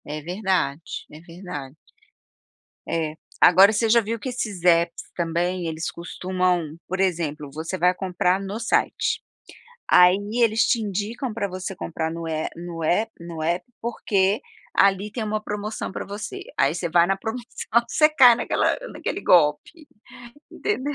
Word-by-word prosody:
É 150 +1 -5
verdade, 180 -4 -1 0.3
é 150 - -11
verdade. 165 -6 -8 1.1
É, 160 -2 -1 0.3
agora 190 +4 +7
você 225 +1 +1
já 235 +2 +6
viu 230 +1 -3
que 260 - -4
esses 215 -8 -4
apps 170 -1 +3
também, 175 +1 -1
eles 160 0 -3
costumam, 180 -2 -2
por 185 +1 -3
exemplo, 160 -6 -1
você 160 +5 -4
vai 180 0 +3
comprar 180 0 0
no 195 +2 -5
site, 235 - 0 0.7
aí 180 +1 +7 0.3
eles 225 0 +4
te 235 - +2
indicam 215 +5 -3
pra 210 -2 -2
você 185 0 -6
comprar 160 -1 -3
no 165 0 -5
é 160 -1 -2
no 170 -1 -7
app 210 +8 +1
no 170 -1 -7
app, 175 +3 -1
porque 205 -2 0 0.3
ali 195 +1 +3
tem 230 - -3
uma 215 0 -2
promoção 210 0 -4
pra - - -5
você, 205 +1 -6 0.2
aí - - +3
você 170 0 -2
vai 170 +1 +5
na 195 +1 +1
promoção 230 +4 -5 0.4
você 305 +5 +4
cai 260 -6 +7
naquela - - 0 0.2
naquele 400 - -4
golpe, 175 - +2 0.6
entendeu. 290 -8 -2
185 Hz, 150 wpm, -23 LUFS, 170-215 Hz, 1.1 s, agora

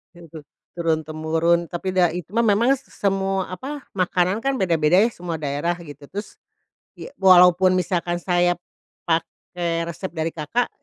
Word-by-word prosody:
gitu, 165 -3 -12 0.3
turun 160 -2 0
temurun, 165 +2 0
tapi 180 +3 -4
dai 180 -1 +2
cuma 230 +5 0
memang 230 +6 +4
s 275 - -16
s - - -20
semua, 195 -1 0
apa, 275 +8 -6
makanan 185 +2 +1
kan 275 0 +1
beda-beda 170 -2 +3
ya 225 +3 +4
semua 175 -3 -5
daerah, 145 +5 -1
gitu. 145 -2 -11
Terus, 205 +2 -7 0.6
ya, - - -8
walaupun 185 0 +6
misalkan 175 -1 -1
saya 175 0 +1 0.5
pakai 170 0 -2
resep 175 +2 -6
dari 160 -1 -2
Kakak, 170 +11 -1
175 Hz, 150 wpm, -22 LUFS, 165-190 Hz, 0.6 s, walaupun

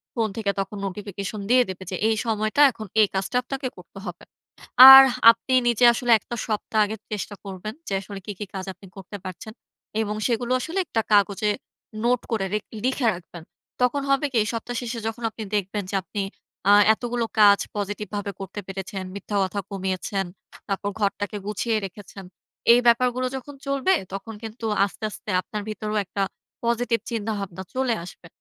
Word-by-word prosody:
Phone 225 -3 +1
থেকে 210 -3 0
তখন 195 +1 -3
notification 200 +1 -6
দিয়ে 250 +1 +6
দেবে, 190 0 -6
যে - - -2
এই 220 - +2
সময়টা 215 +3 +1
এখন 220 -2 -8 0.2
এই 210 - +5
কাজটা 190 +5 -2
আপনাকে 270 +1 -4
করতে 180 +2 -12
হবে। 180 -2 -7 0.7
আর 270 0 +13 0.3
আপনি 230 +3 -4
নিজে 240 0 +4
আসলে 240 +1 0
একটা 240 - -7
সপ্তাহ 215 0 -1
আগে 210 +2 -4 0.2
চেষ্টা 210 0 -4
করবেন 195 +2 -6
যে, - - -3
আসলে 200 0 -8
কী, - - -4
কী 210 - -3
কাজ 190 -1 -4
আপনি 190 +2 -16
করতে 195 +2 -8
পারছেন। 185 +4 -8 0.5
এবং 210 -1 -2
সেগুলো 240 0 -1
আসলে 330 +8 -3
একটা 225 - 0
কাগজে 205 0 +3 0.5
নোট 245 0 +2
করে 215 -4 0
রেখ 210 0 -1 0.2
লিখে 255 -1 +1
রাখবেন। 175 -1 -10 0.4
তখন 250 +3 +2
হবে 275 +1 +3
কি? - - -7
এই - - -5
সপ্তাহ 235 +1 -4
শেষে 235 -1 -4
যখন 225 +1 -5
আপনি 220 - -7
দেখবেন 205 +1 -1
যে - - -2
আপনি 200 +3 -4 0.5
আ - - +8 0.2
এতগুলো 240 +1 -2 0.2
কাজ 200 -1 +7 0.2
পজিটিভভাবে 205 0 -4
করতে 195 +1 -6
পেরেছেন, 195 0 -5
মিথ্যা 200 +1 -3
কথা 190 +2 -2
কমিয়েছেন, 190 0 -2 0.4
তারপর 200 0 -2
ঘরটাকে 205 0 -1
গুছিয়ে 215 +2 0
রেখেছেন। 195 +1 -10 0.5
এই 240 - +6
ব্যাপারগুলো 250 +2 +3
যখন 270 +2 -8
চলবে 275 +7 +2 0.2
তখন 200 +3 -6
কিন্তু 225 +1 -7 0.2
আস্তে, 205 - -10
আস্তে 210 - -10
আপনার 210 +1 -6
ভিতরও 215 0 -4
একটা 200 - -4 0.4
পজিটিভ 235 0 +1
চিন্তাভাবনা 205 -5 -3
চলে 260 -2 +1
আসবে। 175 -1 -12
210 Hz, 170 wpm, -24 LUFS, 195-235 Hz, 0.7 s, আর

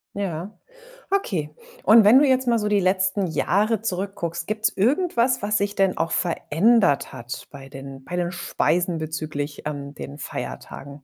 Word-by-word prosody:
Ja, 190 0 -4 0.5
okay. 170 - -1 0.3
Und 220 +1 +7
wenn 225 +6 +7
du 295 - +5
jetzt 260 -1 +2
mal 235 -1 +3
so 210 - -1
die 205 -1 +3
letzten 185 +1 +1
Jahre 210 +6 +1
zurückguckst, 185 -5 -3
gibt's 215 +1 +1
irgendwas, 250 - +2
was 205 +1 +1
sich 200 0 -1
denn 195 -1 +2
auch 165 0 -1
verändert 175 -1 +2
hat 120 -1 -7
bei 135 -1 -11
den 135 0 -10
bei 180 - -6
den 175 0 -1
Speisen 175 -1 0
bezüglich 155 -2 -4
an 140 -1 -5
den 140 +1 -8
Feiertagen? 140 0 -7
185 Hz, 160 wpm, -23 LUFS, 150-210 Hz, 0.5 s, Und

